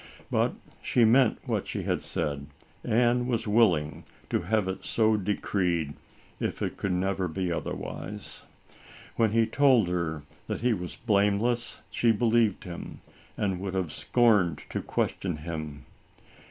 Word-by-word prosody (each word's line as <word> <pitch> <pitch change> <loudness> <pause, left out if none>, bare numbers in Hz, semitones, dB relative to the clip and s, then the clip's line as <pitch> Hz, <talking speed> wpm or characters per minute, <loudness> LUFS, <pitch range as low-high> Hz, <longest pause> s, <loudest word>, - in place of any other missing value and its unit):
But - - +2 0.3
she 120 - +3
meant 125 +1 +5
what - - -1
she - - -3
had - - 0
said, 70 -1 -2 0.4
and 120 +2 +2
was 115 -2 -1
wil 110 +1 +6
ling 75 -1 -4 0.3
to - - +1
have 110 -3 +1
it 95 0 -4
so 110 -1 +2
decreed, 90 -6 0 0.5
if - - -2
it - - -2
could 100 - -2
never 95 +1 0
be 90 +2 -2
otherwise. 100 +4 -5 0.7
When 110 -2 +3
he 115 +1 +4
told 130 -8 +4
her 80 -4 -2 0.2
that - - -3
he 120 0 +3
was 90 -4 -5
blame 100 -3 +2
less, 120 +1 -1
she 115 - +3
believed 115 -2 +2
him, 85 -2 -8 0.4
and 95 -3 -1
would 95 0 -4
have 90 -5 -1
scorned 105 -10 +2
to - - -2
question 90 -5 -2
him. 75 -3 -6
100 Hz, 150 wpm, -28 LUFS, 90-115 Hz, 0.7 s, wil